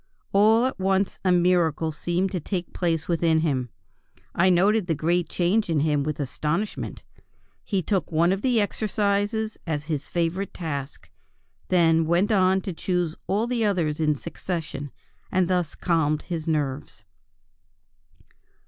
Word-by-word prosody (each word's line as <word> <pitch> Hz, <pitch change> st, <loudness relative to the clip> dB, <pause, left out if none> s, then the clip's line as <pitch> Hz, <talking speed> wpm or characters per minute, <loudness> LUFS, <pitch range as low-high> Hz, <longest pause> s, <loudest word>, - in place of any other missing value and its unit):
All 220 Hz, +4 st, +5 dB
at 260 Hz, -, -2 dB
once 190 Hz, +1 st, 0 dB
a 185 Hz, -, +3 dB
miracle 170 Hz, -3 st, +2 dB
seemed 175 Hz, +4 st, -1 dB
to 185 Hz, -, -2 dB
take 180 Hz, +2 st, -4 dB
place 165 Hz, -3 st, -1 dB
within 165 Hz, -2 st, +2 dB
him. 130 Hz, -6 st, -1 dB, 0.6 s
I 185 Hz, +2 st, +3 dB
noted 195 Hz, +3 st, +3 dB
the 165 Hz, -, +1 dB
great 170 Hz, +3 st, 0 dB
change 185 Hz, +4 st, +1 dB
in 155 Hz, -3 st, +2 dB
him 150 Hz, -1 st, +1 dB
with 150 Hz, +1 st, -3 dB
astonishment. 155 Hz, +8 st, -3 dB, 0.6 s
He 195 Hz, -4 st, -1 dB
took 190 Hz, -2 st, -1 dB
one 165 Hz, +2 st, +3 dB
of 195 Hz, +1 st, -1 dB
the 245 Hz, -2 st, +2 dB
exercises 210 Hz, +1 st, -1 dB
as 150 Hz, -3 st, -2 dB
his 150 Hz, -2 st, -3 dB
favorite 175 Hz, +3 st, -2 dB
task, 140 Hz, -, -5 dB, 0.6 s
then 165 Hz, -3 st, +3 dB
went 175 Hz, +6 st, +2 dB
on 190 Hz, -2 st, +3 dB
to 185 Hz, -, -5 dB
choose 175 Hz, -1 st, -1 dB
all 205 Hz, +4 st, +1 dB
the 240 Hz, -1 st, -1 dB
others 170 Hz, -8 st, 0 dB
in 150 Hz, -1 st, +2 dB
succession, 160 Hz, -2 st, -5 dB, 0.4 s
and 185 Hz, -1 st, +2 dB
thus 180 Hz, -4 st, 0 dB
calmed 155 Hz, -3 st, 0 dB
his 165 Hz, -2 st, -5 dB
nerves." 145 Hz, -3 st, -2 dB
175 Hz, 145 wpm, -25 LUFS, 160-195 Hz, 0.6 s, All